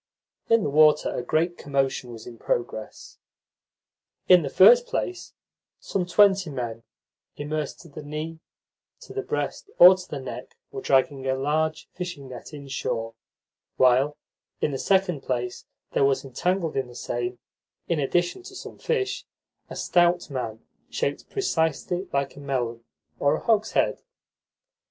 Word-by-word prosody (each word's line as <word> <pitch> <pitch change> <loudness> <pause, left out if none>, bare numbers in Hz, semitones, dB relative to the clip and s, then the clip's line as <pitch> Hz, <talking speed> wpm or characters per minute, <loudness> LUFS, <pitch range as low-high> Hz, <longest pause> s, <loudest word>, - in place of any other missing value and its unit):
In 230 -2 +4
the - - 0
water 150 0 +4
a - - -1
great 170 +7 0
commotion 135 -3 -1
was 115 -1 -10
in 115 -2 -11
progress. 120 -2 -4 1.1
In 180 -1 +8
the 140 - -3
first 485 - +7
place, 370 -7 -4 0.4
some 180 -2 -2
twenty 190 0 +4
men, 120 -5 -4 0.6
immersed 150 0 -4
to - - -14
the 145 - -9
knee, 155 +2 -6 0.6
to - - -11
the 405 - -2
breast, 400 - -3
or 180 +2 +10
to 185 -1 -10
the 145 - -4
neck, 130 - -8
were - - -6
dragging 135 0 +2
a 130 - +2
large 155 +3 -1
fishing 175 -7 -6
net 125 +3 -9
inshore, 135 -6 -4 0.6
while, 130 +4 +4 0.4
in - - 0
the 135 - -3
second 190 -6 +2
place, 125 -2 -3 0.3
there - - +2
was 135 0 +2
entangled 170 +6 -1
in 135 -2 -1
the 120 - -13
same, 120 +1 -3 0.5
in 170 -3 0
addition 175 - 0
to 390 +2 -12
some - - -9
fish, 410 -4 -1 0.4
a - - -7
stout 175 -2 +2
man 115 -4 -5 0.2
shaped - - -2
precisely 180 - -1
like 140 0 -1
a - - -11
melon 120 -4 -3 0.4
or 140 - +3
a - - -4
hogshead. 220 -2 +1
150 Hz, 145 wpm, -25 LUFS, 130-180 Hz, 1.1 s, or